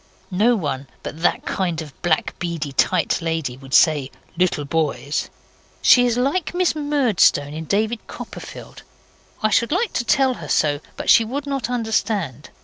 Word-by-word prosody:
No 215 +6 +3
one 140 -8 -3 0.2
but 160 - -7
that 175 - +1
kind 175 -4 -1
of 155 -4 -7
black 165 -3 +1
beady 165 -4 -3
tight 170 +6 +1
lady 160 -6 -2
would 135 +2 -4
say 145 -4 +4 0.3
'little 170 -4 0
boys'. 150 -1 -1 0.5
She 245 -1 +6
is 240 -1 0
like 290 +8 0
Miss 360 -1 +2
Murdstone 255 - +2
in 160 +1 -6
David 220 +5 0
Copperfield. - - -9 0.6
I 215 - +3
should 235 +4 +2
like 395 +7 0
to - - 0
tell 265 +1 +3
her - - -8
so; 145 -2 +2 0.2
but - - +2
she 230 - +7
would 275 +6 -4
not 275 -5 -2
understand. 215 - -2
185 Hz, 160 wpm, -21 LUFS, 155-245 Hz, 0.6 s, she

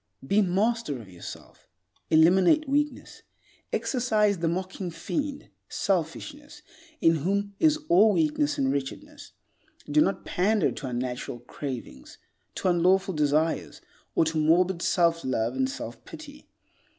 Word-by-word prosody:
Be 200 +9 +3
master 205 - 0
of 110 - -12
yourself. 90 - -11 0.4
Eliminate 180 - +4
weakness. 295 +2 -2 0.5
Exorcise 215 -6 +1
the 165 - 0
mocking 185 +2 -3
fiend, 280 - -4 0.2
selfishness, 285 - -3 0.4
in 165 0 +4
whom 200 +6 -1
is 310 -1 +4
all 205 +5 +5
weakness 150 -3 +1
and 135 -1 +1
wretchedness. 135 -1 -6 0.5
Do 150 +1 +3
not 195 - 0
pander 205 +4 +1
to 135 - -6
unnatural 125 -1 -4
cravings, 125 - -8 0.4
to - - -2
unlawful 185 +2 +2
desires, 150 +1 0 0.4
or 165 - +3
to 160 0 -1
morbid 170 +3 +2
self 170 -2 +2
love 120 -2 -1
and 130 0 0
self 120 -2 -7
pity. 295 -1 -12
175 Hz, 125 wpm, -26 LUFS, 150-210 Hz, 0.5 s, all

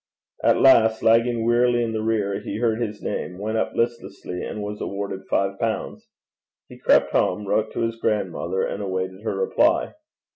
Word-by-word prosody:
At - - +4
last, 110 -4 +5
lagging 115 +1 +3
wearily 120 0 +3
in 115 - -2
the 110 - -2
rear, 105 -3 0
he 100 - -5
heard 115 0 0
his 105 -2 -4
name, 90 - -4
went 110 +3 -2
up - - -2
listlessly, 100 -6 -3
and 105 - -5
was 105 0 -6
awarded 100 -1 -5
five 100 0 0
pounds. 115 -2 -3 0.6
He - - -13
crept - - +3
home, 95 +3 +1
wrote 110 +2 0
to - - -3
his 115 0 -1
grandmother, 95 -4 -1
and 100 - -3
awaited 95 0 -3
her 110 -2 -3
reply. 310 - +2
110 Hz, 175 wpm, -23 LUFS, 100-115 Hz, 0.6 s, last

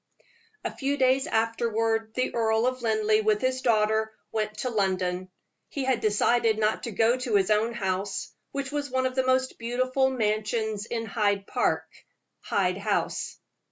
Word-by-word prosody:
A - - -4
few 280 +1 -1
days 265 0 +3
afterward 225 0 0
the 255 - 0
Earl 225 0 +2
of 255 0 -1
Linleigh, 215 -1 +2
with 215 -1 +2
his 255 +1 0
daughter, 220 -1 +2 0.2
went 215 -1 -2
to 250 - -2
London. 185 -3 0 0.4
He 280 - -3
had 260 -3 +1
decided 220 +1 +2
not 215 0 +1
to 235 - -4
go 225 +4 +3
to 250 -4 -1
his 195 +1 +3
own 215 +2 +2
house, 190 0 -2 0.2
which 275 0 -4
was 290 -1 -2
one 260 0 0
of 255 - 0
the 260 0 +1
most 260 0 +1
beautiful 255 +3 +1
mansions 220 -2 -1
in 230 -1 -3
Hyde 205 -2 0
Park - - 0 0.6
Hyde 185 -1 0
House. 205 0 -1
225 Hz, 160 wpm, -27 LUFS, 210-255 Hz, 0.6 s, days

